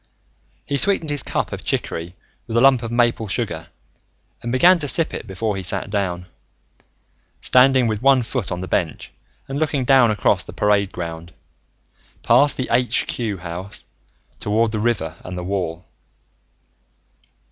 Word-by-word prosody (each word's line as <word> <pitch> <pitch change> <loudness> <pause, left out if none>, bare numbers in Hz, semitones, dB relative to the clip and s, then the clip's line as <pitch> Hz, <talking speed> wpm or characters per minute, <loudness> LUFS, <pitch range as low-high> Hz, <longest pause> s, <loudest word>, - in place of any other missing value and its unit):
He 140 - -1
sweetened 170 -2 +3
his 145 -2 +1
cup - - -2
of - - -6
chicory 85 +2 -3 0.3
with 115 0 -2
a - - +4
lump 135 -2 +5
of 115 -1 -5
maple 120 -2 +1
sugar 95 - -3 0.7
and 120 - -4
began 175 +8 +5
to 145 - -1
sip 165 +3 0
it - - -6
before 100 +2 -2
he 95 - -4
sat 95 +2 +1
down, 90 -4 -2 1.1
standing 130 0 +4
with 110 -2 -1
one 135 -1 +4
foot 115 -2 -3
on 90 - -3
the 95 - -5
bench 85 -4 -2 0.4
and 135 +1 -4
looking 145 -4 0
down 130 -3 +5
across 105 - +1
the - - -11
parade 100 -2 +1
ground, 85 0 -7 0.9
past 145 0 +4
the 130 - -2
Aitch 120 +1 +2
Cue 110 -5 -3
House, 90 +4 -7 0.5
toward 110 +2 +1
the 110 - -2
river 100 -8 -1
and 90 0 -7
the 90 - -4
wall. 90 -3 -3
110 Hz, 160 wpm, -21 LUFS, 90-130 Hz, 1.1 s, lump